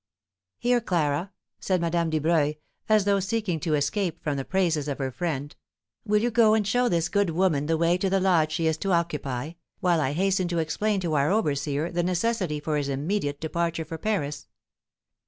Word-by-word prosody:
"Here, 245 Hz, 0 st, +2 dB
Clara," 170 Hz, -2 st, 0 dB, 0.3 s
said 185 Hz, -1 st, 0 dB
Madame 170 Hz, 0 st, 0 dB
Dubreuil, 155 Hz, -1 st, +1 dB, 0.3 s
as 215 Hz, -2 st, +4 dB
though 200 Hz, -1 st, +3 dB
seeking 195 Hz, -3 st, -1 dB
to 155 Hz, 0 st, 0 dB
escape 170 Hz, +3 st, -1 dB
from 150 Hz, -2 st, -1 dB
the 135 Hz, -, -2 dB
praises 165 Hz, -4 st, 0 dB
of 140 Hz, -, -2 dB
her 135 Hz, -2 st, -2 dB
friend, 145 Hz, +1 st, -3 dB, 0.5 s
"will 210 Hz, +1 st, +2 dB
you 240 Hz, -, +1 dB
go 220 Hz, -1 st, +5 dB
and 215 Hz, -2 st, +1 dB
show 245 Hz, +4 st, +2 dB
this 170 Hz, -1 st, +1 dB
good 200 Hz, -1 st, +1 dB
woman 160 Hz, -4 st, +1 dB
the 165 Hz, 0 st, +1 dB
way 170 Hz, +2 st, +2 dB
to 195 Hz, -, 0 dB
the 195 Hz, +1 st, +2 dB
lodge 170 Hz, -5 st, +3 dB
she 165 Hz, +1 st, -1 dB
is 160 Hz, -1 st, +1 dB
to 195 Hz, +3 st, -1 dB
occupy, 150 Hz, -5 st, -1 dB, 0.3 s
while 175 Hz, -3 st, +2 dB
I 140 Hz, -1 st, 0 dB
hasten 190 Hz, +2 st, +1 dB
to 170 Hz, -1 st, -2 dB
explain 195 Hz, +6 st, 0 dB
to 170 Hz, -3 st, -2 dB
our 140 Hz, -1 st, +2 dB
overseer 150 Hz, -5 st, 0 dB
the 175 Hz, 0 st, 0 dB
necessity 180 Hz, -2 st, 0 dB
for 150 Hz, 0 st, -1 dB
his 140 Hz, -1 st, -2 dB
immediate 145 Hz, +1 st, -2 dB
departure 165 Hz, 0 st, -2 dB
for 160 Hz, 0 st, -7 dB
Paris?" 150 Hz, -9 st, -2 dB
170 Hz, 190 wpm, -26 LUFS, 150-195 Hz, 0.5 s, go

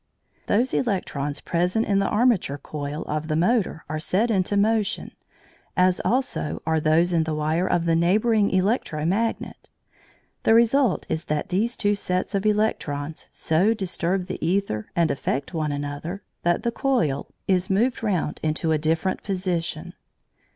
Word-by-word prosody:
Those 240 Hz, +5 st, +2 dB
electrons 150 Hz, -, -1 dB
present 180 Hz, +6 st, 0 dB
in 200 Hz, -1 st, +2 dB
the 195 Hz, -, +1 dB
armature 210 Hz, -, +2 dB
coil 145 Hz, +1 st, -5 dB
of 155 Hz, +1 st, -3 dB
the 155 Hz, -, 0 dB
motor 185 Hz, 0 st, +1 dB
are 155 Hz, +1 st, -3 dB
set 205 Hz, +9 st, +1 dB
into 200 Hz, 0 st, +1 dB
motion, 215 Hz, 0 st, +1 dB, 0.7 s
as 180 Hz, 0 st, +3 dB
also 255 Hz, -, -1 dB
are 160 Hz, 0 st, +2 dB
those 160 Hz, +3 st, +3 dB
in 165 Hz, -1 st, +3 dB
the 160 Hz, -1 st, -2 dB
wire 155 Hz, +4 st, 0 dB
of 170 Hz, -1 st, +1 dB
the 165 Hz, -1 st, +3 dB
neighbouring 205 Hz, +5 st, +3 dB
electro 185 Hz, -5 st, 0 dB
magnet. 220 Hz, +7 st, -2 dB, 0.7 s
The 225 Hz, -, +4 dB
result 235 Hz, -1 st, +3 dB
is 160 Hz, -, -3 dB
that 150 Hz, 0 st, -2 dB
these 225 Hz, +7 st, 0 dB
two 205 Hz, -1 st, +2 dB
sets 185 Hz, -1 st, -2 dB
of 200 Hz, +1 st, 0 dB
electrons 160 Hz, -8 st, -1 dB
so 185 Hz, +8 st, +2 dB
disturb 185 Hz, -2 st, -1 dB
the 185 Hz, -, -5 dB
æther 170 Hz, -, 0 dB
and 170 Hz, -3 st, +2 dB
affect 140 Hz, +2 st, -2 dB
one 155 Hz, -3 st, -1 dB
another 145 Hz, +6 st, -5 dB, 0.2 s
that 175 Hz, 0 st, +1 dB
the 235 Hz, -, 0 dB
coil 175 Hz, -, 0 dB, 0.2 s
is 185 Hz, -1 st, +1 dB
moved 235 Hz, +7 st, +1 dB
round 185 Hz, -9 st, -1 dB
into 155 Hz, +1 st, 0 dB
a 155 Hz, -, +2 dB
different 160 Hz, +4 st, 0 dB
position. 175 Hz, -3 st, -3 dB
180 Hz, 155 wpm, -24 LUFS, 155-210 Hz, 0.7 s, The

